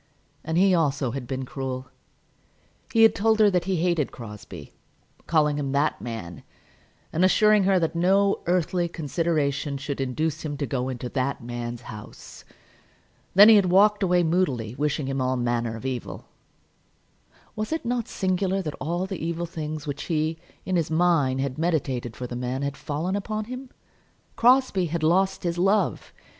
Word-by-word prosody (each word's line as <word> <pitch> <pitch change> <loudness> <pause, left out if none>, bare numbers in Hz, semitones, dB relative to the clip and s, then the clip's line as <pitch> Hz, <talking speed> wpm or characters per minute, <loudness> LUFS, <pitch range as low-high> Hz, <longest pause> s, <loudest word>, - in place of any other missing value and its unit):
And 160 +1 -2
he 190 +1 +5
also 145 -6 +1
had 130 -1 -5
been 130 0 -3
cruel. 130 -2 -5 1.0
He 225 -1 +5
had 225 - +7
told 220 +1 +2
her 210 -2 +6
that 180 -2 0
he 190 0 0
hated 170 -3 0
Crosbie, 105 - -10 0.5
calling 150 -3 +2
him 140 -1 -2
"that 145 +2 +1
man," 100 -8 -6 0.7
and 165 - +1
assuring 210 +1 +4
her 195 -1 +4
that 165 -3 0
no 195 +3 +2
earthly 175 0 +1
consideration 150 -3 -1
should 140 0 -4
induce 140 +4 -2
him 145 -2 -4
to 140 - -2
go 130 -2 -2
into 125 -1 -5
"that 130 -1 -2
man's 120 0 -5
house." 105 -3 -11 0.9
Then 205 +2 +10
he 220 -1 +9
had 195 -2 +3
walked 205 +3 +4
away 180 -2 +3
moodily 150 -10 0
wishing 150 +1 -1
him 135 0 -2
all 130 0 0
manner 120 -1 -1
of 115 - -9
evil. 130 -3 -5 1.3
Was 215 +4 -3
it 320 -5 -2
not 240 -1 -1
singular 190 0 0
that 150 -3 -4
all 175 +4 -1
the 190 -4 -6
evil 170 +1 -2
things 155 -3 -5
which 145 -2 -5
he, 160 -1 -1 0.3
in 185 -1 0
his 165 - 0
mind, 160 -6 +2
had 135 0 -3
meditated 135 -8 -1
for 125 - -6
the 120 - -6
man, 125 +2 -3
had 140 0 -2
fallen 160 +6 -3
upon 215 +2 -3
him. 255 +2 -8 0.7
Crosbie 245 -7 +3
had 165 0 -3
lost 190 +4 +2
his 175 -1 -1
love! 195 +4 +1
160 Hz, 170 wpm, -25 LUFS, 135-185 Hz, 1.3 s, Then